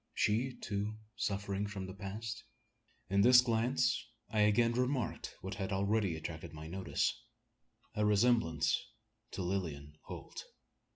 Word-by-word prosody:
She, 120 +5 +1
too, 105 +1 -3 0.2
suffering 100 -2 -1
from 100 -2 -5
the 95 - -7
past? 105 +3 -5 0.7
In 100 0 +4
this 125 +3 +9
glance 125 +2 +1 0.3
I 110 - +1
again 105 +3 +5
remarked 125 0 -1
what 95 +2 -4
had 100 -1 -3
already 100 -2 +1
attracted 80 +1 -6
my 80 0 -8
notice 95 +4 -1 0.7
a 105 - 0
resemblance 105 -6 +3 0.5
to 95 - -4
Lilian 75 -6 -3
Holt! - - -7
100 Hz, 125 wpm, -34 LUFS, 95-115 Hz, 0.7 s, this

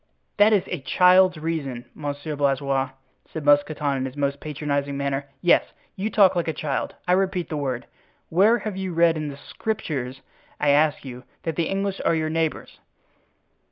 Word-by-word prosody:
'" - - -48
"That 210 +1 +7
is 205 -4 +3
a - - -4
child's 180 +4 +4
reason, 150 -6 -3
Monsieur 145 +1 -5
Blaisois," 135 -1 0 0.4
said 155 -2 -6
Mousqueton 145 -1 +2
in 130 - -2
his 130 +2 -7
most 140 0 -1
patronizing 145 -2 -2
manner. 140 0 -2
"Yes, 175 - +5 0.3
you 200 +3 -2
talk 200 -4 +5
like 170 -1 0
a 160 - 0
child—I 150 +4 -3
repeat 185 -1 +1
the 155 - -3
word. 130 -4 -3 0.4
Where 205 +8 +4
have 215 -4 -5
you 190 -2 -4
read 170 0 +4
in 155 -1 -3
the 140 -1 -7
Scriptures, 140 - -4 0.4
I 150 - +2
ask 150 +1 +3
you, 125 -1 -8 0.2
that 165 -2 -2
the 165 0 0
English 195 0 -2
are 165 - +2
your 155 -1 -1
neighbors?" 160 -1 -2
155 Hz, 175 wpm, -24 LUFS, 140-180 Hz, 0.4 s, That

